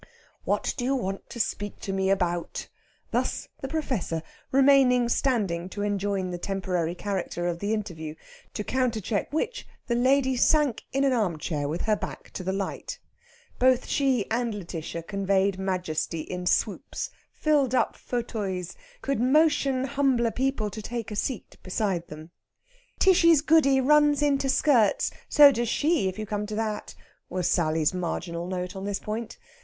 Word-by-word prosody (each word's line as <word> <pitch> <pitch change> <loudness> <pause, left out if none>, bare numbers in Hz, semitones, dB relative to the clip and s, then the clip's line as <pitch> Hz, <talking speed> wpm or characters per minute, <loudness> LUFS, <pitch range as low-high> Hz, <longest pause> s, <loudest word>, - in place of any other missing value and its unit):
"What - - 0
do 245 - -2
you 270 +2 +1
want 195 -6 -4
to 235 - -8
speak 205 -2 -2
to 195 - -3
me 190 0 +1
about?" 175 -3 -1 0.4
Thus - - -1
the 270 - -3
Professor, 255 - -2 0.3
remaining 265 -2 +5
standing 200 -10 0
to 205 +1 -4
enjoin 200 -2 -1
the 175 - -4
temporary 180 -3 -2
character 185 -3 -3
of 170 -1 -2
the 205 +3 -2
interview; 170 -8 -4 0.4
to 210 - -2
countercheck 225 -5 -1
which 400 +11 -2 0.2
the 240 - -1
lady 260 +2 +3
sank 290 -1 +2
in 275 +1 +1
an 270 -2 +3
armchair 165 -9 -1
with 160 +4 -3
her 215 -1 +2
back - - -7
to 185 - -6
the 190 - -1
light. 195 0 -4 0.6
Both 255 0 +4
she 265 -7 +1
and 235 -1 0
Lætitia 170 -3 -6
conveyed 195 -1 +1
majesty 180 -4 -2
in 180 +2 -5
swoops - - -1 0.2
filled 285 -5 +2
up - - +1
fauteuils 205 -7 -4 0.3
could 275 -5 0
motion 275 0 +3
humbler 265 -4 +1
people 250 -3 -1
to 215 - -6
take 230 0 -5
a - - -4
seat 240 +2 -3
beside 185 -2 -1
them. 155 +2 -10 0.7
"Tishy's 335 -5 +5
Goody 300 -4 +4
runs 295 +1 +4
into 275 -2 +2
skirts 250 -6 +3 0.2
so 290 -1 +8
does 240 -2 -1
she 305 - +2
if 185 - -8
you 215 - -4
come 210 0 -3
to 215 - -4
that!" 215 -1 -3 0.3
was 180 -1 -1
Sally's 160 -2 +2
marginal 175 -1 -3
note 180 0 -4
on 190 0 -5
this 200 -1 -1
point. 220 +1 -5
210 Hz, 160 wpm, -26 LUFS, 185-265 Hz, 0.7 s, so